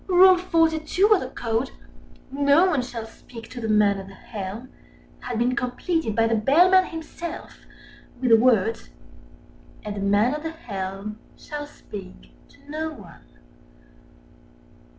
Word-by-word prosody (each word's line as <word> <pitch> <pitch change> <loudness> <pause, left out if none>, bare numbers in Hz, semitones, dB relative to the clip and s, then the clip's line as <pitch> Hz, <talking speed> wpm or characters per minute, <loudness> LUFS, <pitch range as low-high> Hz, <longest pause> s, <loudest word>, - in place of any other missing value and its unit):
Rule 370 0 +7
42 335 +3 +2
of 405 - +3
the 255 - -5
Code, 230 +1 -2 0.6
"No 285 +5 +4
one 320 -8 +1
shall 240 -2 -6
speak 230 +1 -12
to 250 - -7
the 225 - -3
Man 210 -2 +3
at 190 - -9
the 195 - -13
Helm," 210 +4 -7 0.5
had 245 -2 -5
been 245 +2 +1
completed 250 0 -1
by 225 - +3
the 225 - +1
Bellman 350 - +5
himself 330 0 -8 0.6
with 250 -2 0
the - - +10
words 225 -2 +2 1.0
"and 210 -1 -4
the - - -5
Man 205 +5 +2
at 300 - -4
the 320 - -4
Helm 200 - -6 0.2
shall 295 -1 -7
speak 195 -9 -11 0.2
to - - -21
no 315 +2 -3
one." 185 - -14
250 Hz, 145 wpm, -24 LUFS, 215-320 Hz, 1.0 s, the